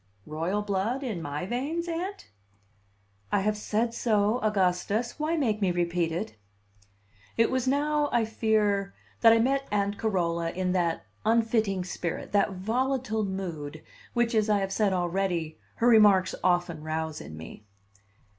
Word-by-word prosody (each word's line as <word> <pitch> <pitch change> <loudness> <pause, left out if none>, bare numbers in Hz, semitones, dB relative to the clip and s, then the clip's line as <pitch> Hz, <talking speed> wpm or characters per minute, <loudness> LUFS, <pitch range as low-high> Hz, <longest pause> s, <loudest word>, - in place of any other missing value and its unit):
"Royal 170 +7 -2
blood 210 +7 -1
in 215 -10 -3
my 145 +3 -4
veins, 285 - -2
Aunt?" 345 - -5 1.0
"I 200 - +2
have 210 +2 +1
said 220 +2 -1
so, 215 0 +1
Augustus. 210 +3 0
Why 315 +2 0
make 220 -8 0
me 195 - +3
repeat 175 -1 0
it?" 175 - -4 1.0
It 230 0 +3
was 260 -1 0
now, 295 +2 +1
I 235 -2 +2
fear, 210 -3 +1 0.2
that 230 - +7
I 230 - +6
met 275 +4 +1
Aunt 205 0 0
Carola 170 -6 0
in 185 0 -1
that 170 - 0 0.2
unfitting 220 -4 +2
spirit, 175 -2 -4
that 205 -1 +2
volatile 230 +3 -1
mood, 165 -6 -5 0.3
which, 240 0 +2
as 215 -1 +2
I 210 - +4
have 195 -1 -2
said 205 -1 +2
already, 175 -3 -1 0.2
her 235 - +1
remarks 205 -5 +6
often 175 -3 +1
rouse 155 0 -3
in 80 - -9
me. 80 +6 -11
205 Hz, 145 wpm, -28 LUFS, 180-230 Hz, 1.0 s, that